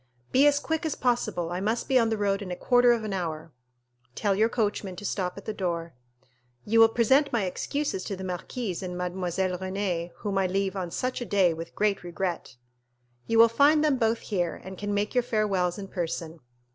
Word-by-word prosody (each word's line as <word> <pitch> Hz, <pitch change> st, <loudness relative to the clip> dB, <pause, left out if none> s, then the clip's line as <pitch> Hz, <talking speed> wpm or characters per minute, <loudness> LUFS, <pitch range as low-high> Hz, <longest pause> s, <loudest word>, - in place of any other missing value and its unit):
"Be 275 Hz, +3 st, +5 dB
as 290 Hz, -1 st, +4 dB
quick 320 Hz, +1 st, -2 dB
as 315 Hz, -3 st, -1 dB
possible, 235 Hz, -9 st, 0 dB
I 175 Hz, -, -2 dB
must 220 Hz, +4 st, -1 dB
be 260 Hz, -1 st, +4 dB
on 230 Hz, -1 st, +2 dB
the 220 Hz, -, 0 dB
road 200 Hz, 0 st, 0 dB
in 195 Hz, -, -6 dB
a 180 Hz, -, -3 dB
quarter 245 Hz, +4 st, +4 dB
of 235 Hz, -2 st, +1 dB
an 210 Hz, -2 st, -3 dB
hour." 165 Hz, -3 st, -4 dB, 0.6 s
"Tell 205 Hz, -2 st, +1 dB
your 215 Hz, +4 st, +3 dB
coachman 205 Hz, -5 st, -1 dB
to 205 Hz, -, -8 dB
stop 185 Hz, -2 st, -2 dB
at 200 Hz, -, -9 dB
the 215 Hz, -, -3 dB
door." 170 Hz, -4 st, -3 dB, 0.7 s
"You 225 Hz, +2 st, +3 dB
will 225 Hz, 0 st, +8 dB
present 265 Hz, +6 st, +3 dB
my 230 Hz, -4 st, +1 dB
excuses 190 Hz, +3 st, -2 dB
to 200 Hz, -, -3 dB
the 190 Hz, -, -8 dB
marquise 185 Hz, +2 st, -4 dB
and 180 Hz, -1 st, -5 dB
Mademoiselle 180 Hz, 0 st, -2 dB
Renée, 185 Hz, -3 st, -2 dB
whom 195 Hz, +1 st, -2 dB
I 190 Hz, -, +2 dB
leave 195 Hz, +1 st, -1 dB
on 185 Hz, -3 st, -3 dB
such 255 Hz, +8 st, -3 dB
a -, -, 0 dB
day 190 Hz, -6 st, +3 dB
with 165 Hz, +1 st, -8 dB
great 205 Hz, -2 st, +1 dB
regret." 175 Hz, -5 st, -4 dB, 0.7 s
"You 230 Hz, -, +1 dB
will 230 Hz, +1 st, +9 dB
find 285 Hz, +6 st, +4 dB
them 295 Hz, -3 st, +3 dB
both 225 Hz, 0 st, +1 dB
here, 175 Hz, -5 st, -2 dB
and 190 Hz, +1 st, -8 dB
can 205 Hz, +2 st, -4 dB
make 205 Hz, +1 st, -1 dB
your 250 Hz, -, +3 dB
farewells 200 Hz, -7 st, 0 dB
in 200 Hz, -1 st, -6 dB
person." 170 Hz, -3 st, -4 dB
200 Hz, 210 wpm, -27 LUFS, 180-230 Hz, 0.7 s, will